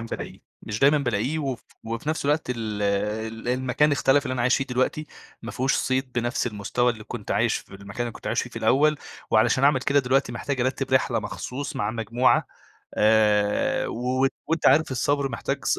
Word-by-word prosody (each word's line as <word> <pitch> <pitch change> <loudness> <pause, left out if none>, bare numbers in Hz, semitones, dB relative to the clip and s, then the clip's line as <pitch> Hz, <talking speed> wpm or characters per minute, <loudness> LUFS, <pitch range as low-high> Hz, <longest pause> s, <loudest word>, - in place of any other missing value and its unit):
بالاقيه. 115 - -7 0.2
مش 105 +1 -4
دايمًا 145 +2 +5
بالاقيه 125 +3 -1
وف 135 -5 -3 0.2
وفي 115 +5 -5
نفس 155 -1 -1
الوقت 145 -1 0
ال 110 -4 -3
ال 110 +3 -2
المكان 130 +4 +1
اختلف 140 0 +3
اللي 130 - -3
أنا 125 -2 -1
عايش 125 - +3
فيه 135 - -1
دلوقتي. 130 +4 -1 0.4
ما - - -6
فيهوش 130 +2 0
صيد 130 -1 -1
بنفس 120 +1 -1
المستوى 120 +3 0
اللي 110 -2 -11
كنت - - -7
عايش - - +2
في - - -14
المكان 100 +3 -9
اللي 120 -1 -1
كنت - - -11
عايش - - 0
فيه - - -8
في - - -13
الأول. 150 +2 +3 0.3
وعلشان 120 +4 +3
اعمل 140 -2 +4
كده 140 +2 +2
دلوقتي 135 +1 +1
محتاج 140 -3 -3
ارتّب 130 +1 -1
رحلة 130 - +2
مخصوص 140 +3 -5
مع 105 +1 -1
مجموعة 115 +3 +1 0.5
آآ 105 -1 +3
وت 130 +3 0 0.2
وأنت 165 +1 +1
عارف 155 -2 +4
الصبر 140 +2 0
محتاج 135 +3 -4
ص - - +2
125 Hz, 190 wpm, -25 LUFS, 115-140 Hz, 0.5 s, دايمًا